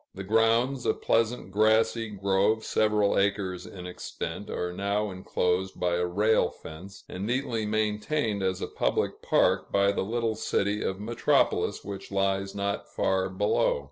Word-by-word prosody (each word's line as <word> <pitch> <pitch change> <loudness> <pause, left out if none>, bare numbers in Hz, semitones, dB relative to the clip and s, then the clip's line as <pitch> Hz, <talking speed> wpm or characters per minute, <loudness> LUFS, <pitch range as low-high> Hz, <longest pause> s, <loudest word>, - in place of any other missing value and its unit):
The 95 - -6
grounds, 115 +5 +2
a - - +2
pleasant 115 -3 0
grassy 110 +2 +2
grove 100 +2 +1
several 105 -2 +2
acres 100 -2 -1
in 90 -2 -9
extent, 90 +1 -6
are 90 0 -3
now 100 +2 -1
enclosed 95 0 -1
by 90 -1 +1
a 90 0 0
rail 105 +5 +2
fence, 90 +5 -11
and 95 +3 -5
neatly 120 -3 -1
maintained 105 +2 0
as 95 -1 -1
a - - -2
public - - -1
park 95 +1 +2
by 100 0 +3
the - - -1
little 115 +2 -1
city 105 -1 -1
of 95 0 -2
Metropolis, 115 +3 +1
which 100 0 -7
lies 95 0 0
not 100 0 -2
far 95 0 0
below. 95 -4 +1
100 Hz, 150 wpm, -27 LUFS, 95-110 Hz, -, by